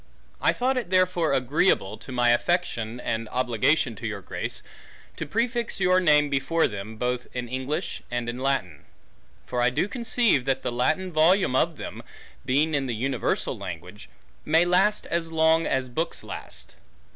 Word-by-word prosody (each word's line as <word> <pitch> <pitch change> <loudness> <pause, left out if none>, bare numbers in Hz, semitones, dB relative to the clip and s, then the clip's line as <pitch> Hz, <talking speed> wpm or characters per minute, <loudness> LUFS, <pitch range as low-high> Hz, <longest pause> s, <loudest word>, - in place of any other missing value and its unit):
I - - +4
thought 260 +1 0
it 235 -8 -2
therefore 185 -3 +2
agreeable, 130 - +2
to 130 - -11
my 120 -1 +3
Affection, 120 -5 0
and 115 -2 -3
Obligation 125 +1 +1
to 115 - -4
your 105 -2 -5
Grace, - - -5 0.5
to - - -4
prefix 235 -1 -1
your 185 -1 +4
Name 150 -4 +4
before 140 +4 +1
them, 105 +1 -5
both 125 +1 -2
in 125 -1 -3
English, 130 +4 -3
and 120 -1 -2
in 120 +1 -4
Latine. 90 - -1 0.6
For 125 - -2
I 120 - +4
doe 125 +10 0
conceive, 235 - +2
that 135 -1 0
the 125 - -1
Latine 155 +10 0
Volume 165 -1 +3
of 165 +3 +1
them, - - -7 0.5
(being 145 +5 +2
in 140 -2 0
the 120 - -2
Universall 130 +2 -1
Language) - - -8 0.3
may 160 +3 +3
last, 190 +4 +2
as 165 -1 -1
long 160 0 +3
as 130 -1 0
Bookes 160 +8 -2
last. - - -8
140 Hz, 165 wpm, -25 LUFS, 120-175 Hz, 0.6 s, I